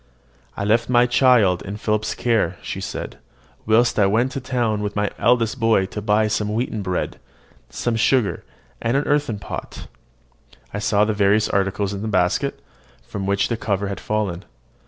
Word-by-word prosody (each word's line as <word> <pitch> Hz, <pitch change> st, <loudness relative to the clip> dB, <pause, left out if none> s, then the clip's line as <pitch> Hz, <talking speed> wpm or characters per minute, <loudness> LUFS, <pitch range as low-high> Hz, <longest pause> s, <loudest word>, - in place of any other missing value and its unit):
"I 100 Hz, -, -2 dB
left 115 Hz, +4 st, +2 dB
my 120 Hz, -1 st, +5 dB
child 120 Hz, -7 st, +4 dB
in 100 Hz, +2 st, -6 dB
Philip's 110 Hz, 0 st, -1 dB
care," 110 Hz, -8 st, 0 dB
she -, -, -5 dB
said, -, -, -6 dB, 0.5 s
"whilst 115 Hz, +1 st, +3 dB
I 100 Hz, -, +5 dB
went 115 Hz, +6 st, +1 dB
into -, -, -1 dB
the 130 Hz, -, -15 dB
town 115 Hz, -5 st, 0 dB
with 105 Hz, 0 st, -3 dB
my 105 Hz, 0 st, 0 dB
eldest 115 Hz, +2 st, +2 dB
boy 115 Hz, -4 st, +3 dB
to 105 Hz, +2 st, -6 dB
buy 105 Hz, +1 st, +2 dB
some 105 Hz, 0 st, -1 dB
wheaten 115 Hz, -2 st, -2 dB
bread, 90 Hz, -2 st, -3 dB, 0.5 s
some 120 Hz, -1 st, -2 dB
sugar, 115 Hz, 0 st, +1 dB, 0.4 s
and 120 Hz, +4 st, +1 dB
an 140 Hz, -, +1 dB
earthen 145 Hz, -7 st, 0 dB
pot." 100 Hz, -, -7 dB, 0.9 s
I 100 Hz, -, -2 dB
saw 105 Hz, -1 st, +2 dB
the 110 Hz, -, 0 dB
various 105 Hz, +1 st, +2 dB
articles 100 Hz, 0 st, 0 dB
in 100 Hz, -, -5 dB
the 110 Hz, -, -3 dB
basket, 90 Hz, -4 st, 0 dB, 0.4 s
from 95 Hz, -1 st, -5 dB
which 100 Hz, 0 st, +1 dB
the 115 Hz, -, -1 dB
cover 100 Hz, -2 st, -1 dB
had 100 Hz, -, -5 dB
fallen. 100 Hz, -4 st, -2 dB
105 Hz, 180 wpm, -21 LUFS, 100-115 Hz, 0.9 s, my